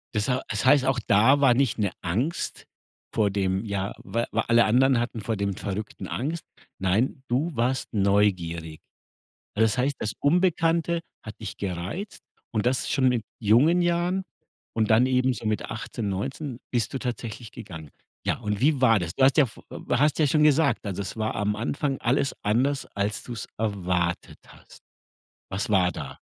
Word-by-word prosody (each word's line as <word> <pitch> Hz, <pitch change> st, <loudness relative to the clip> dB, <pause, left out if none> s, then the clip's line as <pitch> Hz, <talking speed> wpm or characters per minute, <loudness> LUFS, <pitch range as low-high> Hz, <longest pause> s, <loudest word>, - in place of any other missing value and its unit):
Das 105 Hz, +3 st, +1 dB
hei 130 Hz, 0 st, +1 dB
das 110 Hz, +3 st, -1 dB
heißt, 130 Hz, 0 st, +5 dB
auch 135 Hz, -2 st, +1 dB
da 115 Hz, +8 st, +5 dB
war 135 Hz, -3 st, +5 dB
nicht 125 Hz, -2 st, +1 dB
'ne 100 Hz, -4 st, 0 dB
Angst 120 Hz, -, -2 dB, 0.5 s
vor 105 Hz, -3 st, +2 dB
dem 95 Hz, 0 st, 0 dB
ja, 100 Hz, -1 st, -2 dB
wa 115 Hz, +5 st, -2 dB
wa 115 Hz, -, +1 dB
alle 120 Hz, 0 st, +5 dB
anderen 125 Hz, +3 st, +4 dB
hatten 120 Hz, -2 st, -3 dB
vor 110 Hz, +2 st, -2 dB
dem 100 Hz, -1 st, -1 dB
Verrückten 105 Hz, +1 st, -5 dB
Angst. 155 Hz, +6 st, -3 dB, 0.4 s
Nein, 110 Hz, +8 st, 0 dB
du 140 Hz, +5 st, 0 dB
warst 125 Hz, +2 st, -1 dB
neugierig. 90 Hz, -6 st, +1 dB, 0.8 s
Das 110 Hz, 0 st, +3 dB
heißt, 140 Hz, +3 st, +1 dB
das 105 Hz, -1 st, -2 dB
Unbekannte 170 Hz, +1 st, +2 dB, 0.2 s
hat 110 Hz, -, -9 dB
dich 105 Hz, -, -6 dB
gereizt 95 Hz, -, -5 dB, 0.3 s
und 110 Hz, +1 st, 0 dB
das 125 Hz, +1 st, +1 dB
schon 135 Hz, -3 st, +3 dB
mit 120 Hz, -3 st, 0 dB, 0.2 s
jungen 140 Hz, -, +4 dB
Jahren 175 Hz, +2 st, 0 dB, 0.5 s
und 110 Hz, -1 st, +1 dB
dann 115 Hz, +4 st, +5 dB
eben 130 Hz, 0 st, +2 dB
so 115 Hz, -1 st, -7 dB
mit 110 Hz, 0 st, -1 dB
18, 110 Hz, -1 st, -4 dB
19 130 Hz, +6 st, -4 dB
bist 120 Hz, -4 st, 0 dB
du -, -, -1 dB
tatsächlich 120 Hz, -2 st, -5 dB
gegangen. 90 Hz, -, -9 dB, 0.3 s
Ja, -, -, 0 dB
und 105 Hz, -3 st, -3 dB
wie 140 Hz, -1 st, +3 dB
war 115 Hz, -4 st, +5 dB
das? 85 Hz, -1 st, -4 dB
Du 130 Hz, -, +3 dB
hast 135 Hz, -, +4 dB
ja 145 Hz, -4 st, +6 dB
v 110 Hz, -, -12 dB, 0.3 s
hast 145 Hz, +5 st, +3 dB
ja 155 Hz, -, +4 dB
schon 150 Hz, +2 st, +3 dB
gesagt, 140 Hz, -7 st, +3 dB
also 100 Hz, 0 st, -3 dB
es 95 Hz, -, -6 dB
war 110 Hz, 0 st, -1 dB
am 105 Hz, 0 st, 0 dB
Anfang 135 Hz, +4 st, -2 dB
alles 135 Hz, +3 st, +1 dB
anders, 130 Hz, +7 st, +1 dB
als 100 Hz, +1 st, -1 dB
du's 120 Hz, -3 st, -6 dB
erwartet 90 Hz, -5 st, -1 dB
hast. -, -, -17 dB, 0.7 s
Was 95 Hz, +3 st, -2 dB
war 90 Hz, -3 st, +4 dB
da? 70 Hz, -3 st, -7 dB
115 Hz, 175 wpm, -26 LUFS, 100-135 Hz, 0.8 s, ja